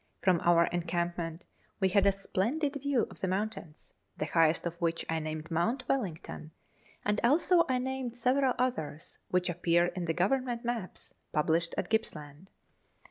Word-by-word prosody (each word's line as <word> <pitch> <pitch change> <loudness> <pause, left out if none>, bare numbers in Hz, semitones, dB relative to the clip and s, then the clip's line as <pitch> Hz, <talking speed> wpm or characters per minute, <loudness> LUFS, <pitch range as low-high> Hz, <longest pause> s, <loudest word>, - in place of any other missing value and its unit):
From 180 -3 +4
our 170 0 +5
encampment 170 -1 -2 0.3
we 190 -2 +3
had 200 +1 +4
a - - +6
splendid 230 +10 -1
view 280 -4 +2
of - - -11
the 190 - 0
mountains, 185 -5 -4 0.2
the - - -1
highest 165 0 +3
of 170 - -1
which 165 -1 0
I 165 0 0
named 155 0 -5
Mount 230 +11 0
Wellington, 165 - -3 0.5
and 210 0 +1
also 335 +7 +4
I 255 - +2
named 255 -1 -3
several 260 +1 +2
others, 170 - -2
which 180 -1 +1
appear 175 0 +2
in 175 0 -3
the 165 - 0
Government 240 +5 0
maps 235 -6 -3 0.2
(published) 165 +2 +1
of - - -1
Gippsland. 165 -6 -3
185 Hz, 155 wpm, -31 LUFS, 165-245 Hz, 0.5 s, a